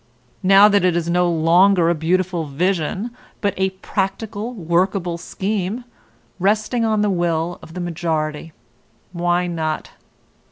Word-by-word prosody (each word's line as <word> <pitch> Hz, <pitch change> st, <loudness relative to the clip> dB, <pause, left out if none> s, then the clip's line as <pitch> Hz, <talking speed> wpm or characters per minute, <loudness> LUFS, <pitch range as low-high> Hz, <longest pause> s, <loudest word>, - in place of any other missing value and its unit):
Now 195 Hz, +2 st, +7 dB
that 205 Hz, -3 st, +3 dB
it 180 Hz, -2 st, +3 dB
is 170 Hz, 0 st, -1 dB
no 180 Hz, 0 st, +2 dB
longer 170 Hz, +2 st, +4 dB
a 170 Hz, -, +3 dB
beautiful 175 Hz, +1 st, 0 dB
vision, 180 Hz, -, -1 dB, 0.3 s
but 200 Hz, -2 st, 0 dB
a 190 Hz, 0 st, +1 dB, 0.2 s
"practical, 205 Hz, +3 st, -2 dB
workable 175 Hz, -2 st, 0 dB
scheme," 200 Hz, +5 st, -3 dB, 0.6 s
resting 215 Hz, +5 st, +1 dB
on 215 Hz, -2 st, +1 dB
the 205 Hz, -, +2 dB
will 175 Hz, -1 st, -1 dB
of 165 Hz, -, -13 dB
the 180 Hz, -, -4 dB
majority, 160 Hz, -2 st, -3 dB, 0.6 s
why 175 Hz, 0 st, 0 dB
not? 160 Hz, -3 st, -3 dB
180 Hz, 130 wpm, -20 LUFS, 170-195 Hz, 0.6 s, Now